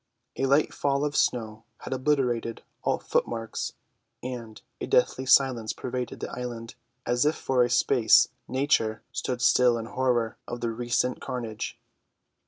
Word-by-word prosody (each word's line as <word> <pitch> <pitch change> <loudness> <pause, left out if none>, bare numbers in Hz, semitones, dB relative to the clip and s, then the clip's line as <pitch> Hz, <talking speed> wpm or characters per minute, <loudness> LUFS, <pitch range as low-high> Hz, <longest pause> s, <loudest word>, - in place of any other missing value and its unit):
A 135 - 0
light 140 +3 +3
fall 140 0 0
of 150 0 -3
snow 110 -2 0 0.2
had - - -4
obliterated 125 -4 0 0.2
all - - +1
footmarks; 115 -1 -2 0.5
and 120 -3 -6 0.2
a - - -4
deathly 130 0 +2
silence 130 -5 +4
pervaded 125 -1 -5
the - - -4
island, 120 -2 -6 0.3
as 120 +1 +2
if 150 +2 +2
for 130 -2 +1
a 120 - 0
space 120 -1 +5 0.2
Nature 130 -5 +1
stood 125 -1 -3
still 125 -1 +5
in 115 - -4
horror 120 -2 0
of 120 - -5
the 115 -1 -1
recent 120 +2 -1
carnage. 115 -4 -5
125 Hz, 145 wpm, -27 LUFS, 115-130 Hz, 0.5 s, space